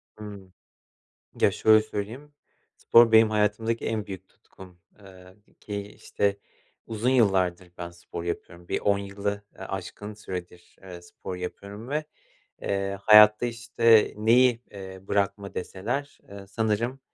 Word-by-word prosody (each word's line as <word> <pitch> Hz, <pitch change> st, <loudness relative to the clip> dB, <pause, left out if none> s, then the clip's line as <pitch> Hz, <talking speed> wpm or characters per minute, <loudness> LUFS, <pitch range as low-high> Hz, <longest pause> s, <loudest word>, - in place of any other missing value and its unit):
Hımm. 100 Hz, -3 st, -10 dB, 0.9 s
Ya, -, -, +5 dB
şöyle 110 Hz, 0 st, +5 dB
söyleyeyim, 110 Hz, +7 st, -6 dB, 0.4 s
spor 115 Hz, -1 st, +5 dB
benim 110 Hz, 0 st, +7 dB
hayatımdaki 110 Hz, +2 st, 0 dB
en 110 Hz, -2 st, -2 dB
büyük 95 Hz, -1 st, -9 dB
tutkum, 90 Hz, -2 st, -17 dB, 0.2 s
eee, 95 Hz, -1 st, -15 dB, 0.2 s
ki 100 Hz, -1 st, -5 dB
işte 100 Hz, 0 st, -2 dB, 0.5 s
uzun 115 Hz, +2 st, -1 dB
yıllardır 95 Hz, -7 st, +2 dB
ben 85 Hz, -1 st, -6 dB
spor 85 Hz, 0 st, -9 dB
yapıyorum. 85 Hz, 0 st, -6 dB
Bir -, -, -1 dB
10 100 Hz, -1 st, +2 dB
yılı, 100 Hz, +1 st, -3 dB, 0.3 s
ııı, 95 Hz, -, -8 dB
aşkın 95 Hz, +2 st, -6 dB
süredir, 90 Hz, -4 st, -9 dB
eee, 90 Hz, -2 st, -10 dB
spor 90 Hz, +1 st, -8 dB
yapıyorum 100 Hz, +5 st, -8 dB
ve, 150 Hz, +2 st, -1 dB, 0.6 s
eee, 100 Hz, 0 st, -2 dB
hayatta, 105 Hz, +2 st, +7 dB
işte, 115 Hz, -2 st, +3 dB
neyi, 120 Hz, +2 st, +4 dB
eee, 95 Hz, -1 st, -9 dB
bırakma 100 Hz, 0 st, -1 dB
deseler, 120 Hz, +11 st, -4 dB
eee, 100 Hz, -1 st, -10 dB
sanırım, 110 Hz, +5 st, -1 dB
100 Hz, 130 wpm, -26 LUFS, 95-110 Hz, 0.9 s, benim